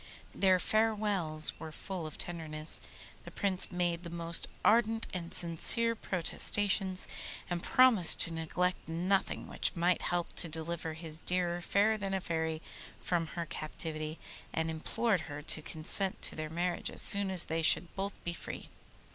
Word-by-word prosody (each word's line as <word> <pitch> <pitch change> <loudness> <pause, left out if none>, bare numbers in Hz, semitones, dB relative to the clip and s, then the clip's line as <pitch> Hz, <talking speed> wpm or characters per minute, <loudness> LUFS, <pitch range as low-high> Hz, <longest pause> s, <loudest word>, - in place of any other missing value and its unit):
Their 190 -1 +3
farewells 205 -7 0
were 160 -1 -8
full 180 0 -6
of 155 - -10
tenderness; 155 -2 +2 0.4
the - - -10
Prince 195 -3 +2
made 175 -1 -1
the 170 - -8
most 170 0 -2 0.2
ardent 225 0 +3
and 175 -2 -6
sincere 205 +7 +4
protestations, 190 0 +1 0.4
and 175 -1 -2
promised 235 -9 +5
to 170 - +5
neglect 170 +2 -2
nothing 180 +4 -1
which - - -2
might 175 +1 +1
help 175 -1 -3
to 170 - +4
deliver 160 0 -5
his 160 0 -6
dear 175 -1 -2
Fairer 210 +4 +1
than 195 -1 -3
a - - -1
Fairy 160 -2 -3 0.4
from 170 -2 -2
her 170 - -2
captivity, 155 0 -6 0.3
and 160 0 -2
implored 195 +5 -1
her 145 +1 -7
to 155 - -1
consent 170 +5 -1
to - - +3
their 155 -1 -5
marriage 175 +2 -3
as - - +1
soon 200 -1 +6
as 185 -2 +2
they 165 +1 -2
should 165 +2 +4
both 200 +1 -5
be 175 - -3
free. - - -8
175 Hz, 155 wpm, -31 LUFS, 160-195 Hz, 0.4 s, soon